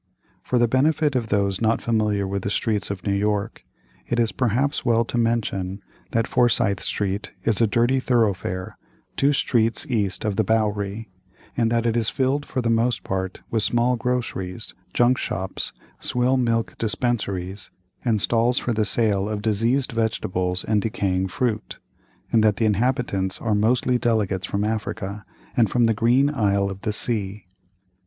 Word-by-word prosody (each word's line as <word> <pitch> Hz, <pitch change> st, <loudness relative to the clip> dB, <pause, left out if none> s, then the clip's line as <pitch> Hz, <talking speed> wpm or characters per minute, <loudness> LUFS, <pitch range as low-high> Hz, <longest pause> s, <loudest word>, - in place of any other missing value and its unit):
For 125 Hz, -, -1 dB
the 120 Hz, 0 st, +4 dB
benefit 145 Hz, +4 st, +2 dB
of 120 Hz, -3 st, 0 dB
those 100 Hz, -2 st, 0 dB
not 115 Hz, 0 st, +2 dB
familiar 105 Hz, -3 st, 0 dB
with 100 Hz, 0 st, -2 dB
the 100 Hz, -, -2 dB
streets 105 Hz, -1 st, -1 dB
of 100 Hz, -2 st, -5 dB
New 100 Hz, -, +1 dB
York, 100 Hz, 0 st, -1 dB, 0.4 s
it 120 Hz, -, 0 dB
is 115 Hz, -2 st, +2 dB
perhaps 130 Hz, +4 st, 0 dB
well 115 Hz, 0 st, +2 dB
to -, -, -5 dB
mention 110 Hz, -5 st, 0 dB, 0.3 s
that 115 Hz, -1 st, +1 dB
Forsyth 115 Hz, -5 st, +2 dB
Street 100 Hz, 0 st, -2 dB
is 115 Hz, -1 st, +1 dB
a 115 Hz, -, +5 dB
dirty 120 Hz, +5 st, +2 dB
thoroughfare, 100 Hz, -7 st, -1 dB, 0.4 s
two 140 Hz, +1 st, +3 dB
streets 120 Hz, -6 st, +1 dB
east 105 Hz, -7 st, -1 dB
of 105 Hz, -2 st, -1 dB
the 110 Hz, -, +3 dB
Bowery, 105 Hz, -1 st, -1 dB, 0.4 s
and 115 Hz, -2 st, +2 dB
that 115 Hz, 0 st, +1 dB
it 115 Hz, -1 st, +1 dB
is 115 Hz, -2 st, +2 dB
filled 135 Hz, +2 st, 0 dB
for 130 Hz, -, -2 dB
the 115 Hz, -, +1 dB
most 115 Hz, -3 st, +1 dB
part 95 Hz, 0 st, -3 dB
with 115 Hz, -, +1 dB
small 120 Hz, +3 st, +2 dB
groceries, 115 Hz, -5 st, -3 dB, 0.2 s
junk 120 Hz, +1 st, +3 dB
shops, 95 Hz, 0 st, -3 dB, 0.3 s
swill 125 Hz, +2 st, +2 dB
milk 115 Hz, -3 st, 0 dB
dispensaries, 105 Hz, -4 st, -2 dB, 0.3 s
and 115 Hz, -4 st, +1 dB
stalls 120 Hz, +4 st, +2 dB
for 120 Hz, -, 0 dB
the 110 Hz, -1 st, +1 dB
sale 105 Hz, -2 st, +1 dB
of 105 Hz, -1 st, -3 dB
diseased 115 Hz, +5 st, +1 dB
vegetables 90 Hz, -5 st, -1 dB
and 105 Hz, -1 st, +1 dB
decaying 95 Hz, -4 st, -1 dB
fruit, 110 Hz, +2 st, -2 dB, 0.5 s
and 110 Hz, -2 st, +4 dB
that 105 Hz, -2 st, +4 dB
the 115 Hz, -, 0 dB
inhabitants 105 Hz, -3 st, 0 dB
are 110 Hz, -2 st, 0 dB
mostly 120 Hz, +4 st, +2 dB
delegates 100 Hz, -6 st, 0 dB
from 100 Hz, +1 st, -1 dB
Africa, 105 Hz, -1 st, -3 dB, 0.3 s
and 115 Hz, -4 st, +3 dB
from 120 Hz, +2 st, +3 dB
the 115 Hz, -, +3 dB
Green 120 Hz, +5 st, +3 dB
Isle 100 Hz, -6 st, +1 dB
of 95 Hz, 0 st, -8 dB
the 105 Hz, -, -1 dB
Sea. 105 Hz, -2 st, -1 dB
110 Hz, 165 wpm, -23 LUFS, 100-120 Hz, 0.5 s, a